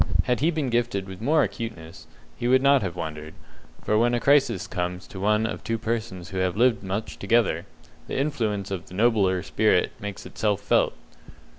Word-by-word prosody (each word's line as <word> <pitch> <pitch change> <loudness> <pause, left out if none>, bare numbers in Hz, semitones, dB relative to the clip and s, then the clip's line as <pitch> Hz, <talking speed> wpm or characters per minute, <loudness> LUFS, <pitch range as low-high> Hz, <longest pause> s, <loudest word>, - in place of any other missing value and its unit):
Had 125 -1 0
he 155 - +3
been 155 -6 -1
gifted 120 -5 0
with 95 +1 -9
more 150 +6 +3
acuteness, 85 -9 -6 0.3
he 120 - -2
would 130 +1 +4
not 140 -1 +5
have 90 -4 -3
wondered; 80 -2 -6 0.5
for 105 - +2
when 120 +1 +3
a - - +1
crisis 135 -7 +3
comes 90 -2 -4
to 95 - -10
one 105 +2 +2
of - - -4
two 115 - -1
persons 110 -5 -4
who 95 - -6
have 95 0 0
lived 120 -3 +3
much 100 +3 -4
together, 100 -6 +1 0.4
the - - -3
influence 110 -9 -1
of 95 -1 -4
the 90 - -11
nobler 100 -5 +2
spirit - - +2
makes 100 -2 -6
itself 105 -2 -1
felt. 100 - +2
105 Hz, 185 wpm, -25 LUFS, 95-120 Hz, 0.5 s, not